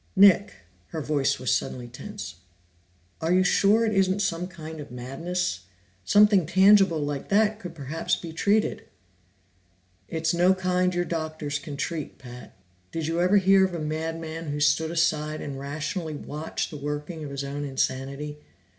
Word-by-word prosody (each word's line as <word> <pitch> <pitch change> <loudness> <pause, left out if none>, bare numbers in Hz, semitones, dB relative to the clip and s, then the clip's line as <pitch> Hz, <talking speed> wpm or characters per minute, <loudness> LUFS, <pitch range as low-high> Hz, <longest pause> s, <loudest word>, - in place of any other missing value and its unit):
"Nick 200 +1 +6
" 90 -1 -35
Her 160 - -5
voice 145 -2 +1
was 130 0 0
suddenly 125 -1 -2
tense. 200 - -8 0.8
"Are 165 +1 0
you 185 +1 +5
sure 205 +4 +4
it 220 - 0
isn't 195 +1 +2
some 175 -1 -1
kind 160 -3 -9
of 145 - -8
madness? 135 - -3 0.4
Something 205 - +5
tangible 190 -1 +5
like 145 -1 -4
that 215 +1 +3
could 175 -5 -8
perhaps 150 +2 -1
be 165 -2 -8
treated." 205 +5 +1 1.2
"It's 160 0 -1
no 180 +2 +4
kind 185 -1 +1
your 175 0 +1
doctors 155 -3 -3
can 145 -2 -7
treat, 155 +1 -4
Pat. 125 -2 -11 0.4
Did 165 -1 -3
you 165 +2 0
ever 185 +3 +4
hear 195 0 +5
of 185 -2 0
a - - -3
madman 160 +1 -4
who 145 0 -3
stood 160 +2 +3
aside 155 -2 0
and 140 -2 -6
rationally 155 +3 -4
watched 150 +2 -4
the 150 - -6
working 150 +3 -5
of 145 - -5
his 140 0 -4
own 140 +1 -4
insanity? 140 +2 -2
160 Hz, 165 wpm, -26 LUFS, 145-185 Hz, 1.2 s, Nick